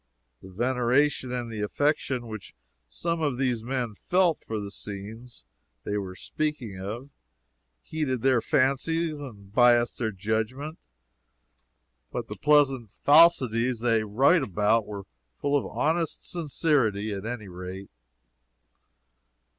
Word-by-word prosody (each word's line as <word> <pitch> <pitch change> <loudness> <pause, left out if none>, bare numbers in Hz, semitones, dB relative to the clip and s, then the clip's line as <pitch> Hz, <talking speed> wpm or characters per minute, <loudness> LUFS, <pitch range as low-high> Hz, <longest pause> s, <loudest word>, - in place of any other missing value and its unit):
The 95 - -12
veneration 125 +5 +1
and 120 -2 -3
the 110 -2 -4
affection 130 +2 0
which 110 - -8 0.3
some 165 - -2
of 145 -5 0
these 125 -4 0
men 125 -2 -2
felt 175 - +2
for 110 -1 -4
the 100 -1 -6
scenes 105 - -9 0.4
they 105 - -2
were 95 -3 -4
speaking 130 -7 -3
of, 115 +9 -6 0.7
heated 130 - -2
their 130 -3 +4
fancies 155 +6 +1
and 100 -8 -10
biased 120 0 +4
their 115 -3 0
judgment; 110 - -3 1.3
but - - -4
the - - -5
pleasant 135 -6 +3
falsities 130 - +4
they 115 -2 +2
wrote 135 - +3 0.4
were 100 -2 -6 0.4
full 145 0 +1
of 145 - +1
honest 160 +2 -1
sincerity, 135 - 0
at 100 +2 -5
any 115 -3 -5
rate. 90 +2 -8
120 Hz, 120 wpm, -27 LUFS, 105-145 Hz, 1.3 s, their